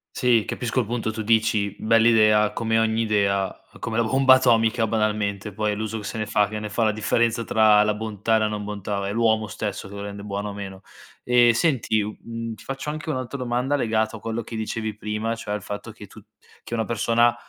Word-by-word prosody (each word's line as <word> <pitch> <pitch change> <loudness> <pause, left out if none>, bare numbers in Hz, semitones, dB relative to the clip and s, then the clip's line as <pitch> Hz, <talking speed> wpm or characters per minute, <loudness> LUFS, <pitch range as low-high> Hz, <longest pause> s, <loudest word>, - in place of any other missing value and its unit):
Si, 120 -3 +3
capisco 125 +1 -2
il 120 - +1
punto 115 -2 -2
tu 110 0 -5
dici: 110 -2 +1
"Bell'idea", 110 -2 +4
come 115 0 +1
ogni 110 0 +1
idea, 100 -3 +1 0.2
come 110 0 -3
la 115 - +3
bomba 130 +2 +6
atomica, 115 -2 +3
banalmente, 105 -2 -1
poi 105 +1 -1
è - - -3
l'uso 110 +1 -4
che 105 - -9
se 105 - -5
ne 110 - -2
fa, 105 -1 +2
che 105 +1 -5
ne 105 - -5
fa 115 +2 0
la 110 - +3
differenza 115 +2 0
tra 110 -2 +5
la 105 - +1
bontà 110 0 -1
e - - +2
la 110 - +1
non 105 -1 -4
bontà; 100 -1 -4
è 100 - -2
l'uomo 110 -1 +2
stesso 105 -2 -5
che 100 - -12
lo 100 - -6
rende 100 0 -7
buono 100 0 -4
o - - -6
meno. 95 -1 -8 0.4
Ehm, 120 -1 +5
senti 115 -4 +1
u 105 +1 -5
mhmm, 115 -1 -6
ti - - -15
faccio 135 +2 -5
anche 155 +1 -5
un'altra 130 0 -4
domanda 125 +2 -1
legato 110 -4 0
a - - -8
quello 115 +2 -3
che 115 0 -8
dicevi 110 -1 -3
prima, 105 +2 -3
cioè 110 -2 -5
al 105 - -3
fatto 105 +1 -7
che - - -12
tu - - -14 0.4
che - - -9
una 115 -2 0
persona 115 +1 +2
110 Hz, 225 wpm, -24 LUFS, 105-115 Hz, 0.4 s, bomba